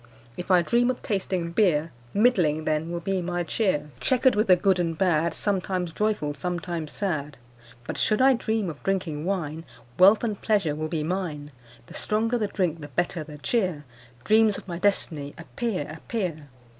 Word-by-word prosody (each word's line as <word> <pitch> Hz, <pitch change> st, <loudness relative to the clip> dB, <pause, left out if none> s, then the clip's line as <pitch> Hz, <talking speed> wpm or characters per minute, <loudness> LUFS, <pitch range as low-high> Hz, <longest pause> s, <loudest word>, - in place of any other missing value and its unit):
If 180 Hz, -, -7 dB
I 180 Hz, -2 st, +5 dB
dream 240 Hz, +6 st, +2 dB
of 255 Hz, -, -1 dB
tasting 185 Hz, -4 st, -2 dB
beer, 165 Hz, -5 st, +2 dB, 0.2 s
Middling 180 Hz, -9 st, +2 dB
then 155 Hz, +1 st, 0 dB
will 170 Hz, 0 st, -3 dB
be 190 Hz, +1 st, -1 dB
my 175 Hz, 0 st, -2 dB
cheer 160 Hz, -5 st, -1 dB
Chequer'd 260 Hz, -, +3 dB
with 210 Hz, +2 st, +1 dB
the 185 Hz, -, +7 dB
good 185 Hz, +1 st, +2 dB
and 165 Hz, -2 st, -1 dB
bad, 170 Hz, -3 st, +2 dB
Sometimes 185 Hz, -4 st, -1 dB
joyful, 210 Hz, -9 st, 0 dB
sometimes 170 Hz, 0 st, -4 dB
sad; 150 Hz, -8 st, -3 dB, 0.5 s
But -, -, -4 dB
should 215 Hz, -, +2 dB
I 265 Hz, +1 st, +6 dB
dream 220 Hz, -4 st, -1 dB
of 155 Hz, -4 st, -6 dB
drinking 170 Hz, -6 st, -2 dB
wine, 165 Hz, -5 st, -2 dB, 0.4 s
Wealth 200 Hz, +5 st, +7 dB
and 215 Hz, -4 st, -2 dB
pleasure 200 Hz, -9 st, +1 dB
will 155 Hz, +1 st, -3 dB
be 155 Hz, -1 st, -2 dB
mine. 155 Hz, -4 st, -3 dB, 0.3 s
The -, -, -14 dB
stronger 225 Hz, +3 st, 0 dB
the 210 Hz, -, 0 dB
drink, 175 Hz, -5 st, -1 dB
the 145 Hz, -, -7 dB
better 170 Hz, +3 st, -2 dB
the 150 Hz, -1 st, -10 dB
cheer 170 Hz, -, -1 dB, 0.4 s
Dreams 215 Hz, +3 st, +4 dB
of -, -, -11 dB
my 170 Hz, -2 st, -5 dB
destiny, 160 Hz, -7 st, 0 dB
appear, 185 Hz, 0 st, -3 dB
appear!' 160 Hz, -, -4 dB
180 Hz, 175 wpm, -26 LUFS, 155-205 Hz, 0.5 s, the